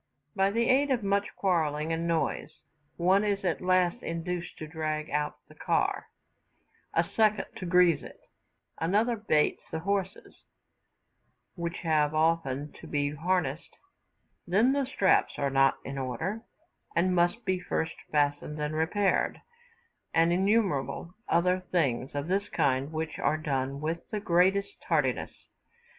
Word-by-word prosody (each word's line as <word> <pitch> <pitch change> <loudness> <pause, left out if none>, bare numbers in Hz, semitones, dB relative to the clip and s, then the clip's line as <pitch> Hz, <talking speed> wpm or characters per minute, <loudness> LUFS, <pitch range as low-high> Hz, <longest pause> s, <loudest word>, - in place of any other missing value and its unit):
By 195 0 +3
the 230 +3 +1
aid 275 +2 +3
of 250 -5 +1
much 200 +1 +1
quarrelling 160 -4 0
and 165 +1 -2
noise, 165 -1 -1 0.5
one 185 +4 +3
is 200 -2 -1
at 175 - 0
last 180 -1 +2
induced 170 +1 -4
to 155 - -6
drag 155 -1 -3
out 150 0 -1
the - - -16
car, - - 0 0.9
a - - +4
second 215 -2 +1
to 185 - -5
grease 180 -1 +4
it, - - -11 0.6
another 210 +8 +2
baits 180 -9 +1
the 160 - -4
horses, 195 +1 -3 1.2
which 170 -1 -4
have 155 -2 +2
often 155 -3 +1
to - - -10
be 145 -1 0
harnessed, 160 -1 -2 0.7
then 215 +9 +3
the 280 -2 0
straps 195 -7 +2
are 140 -1 0
not 135 0 +4
in 135 0 -5
order, 160 - -3 0.5
and 180 +2 +2
must 175 +6 +1
be 185 -1 0
first 160 -2 -2 0.2
fastened 145 0 0
and 150 +1 -2
repaired; 175 +6 +1 0.8
and 165 +1 +4
innumerable 180 - 0 0.2
other 180 +2 +3
things 135 -7 +1
of 145 +2 -2
this 200 +3 0
kind, 135 +2 +1
which 160 0 -4
are 155 - +1
done 140 -3 -2
with 165 +2 -3
the 210 - -2
greatest 195 +2 +2
tardiness. 145 -7 -1
170 Hz, 140 wpm, -29 LUFS, 150-195 Hz, 1.2 s, a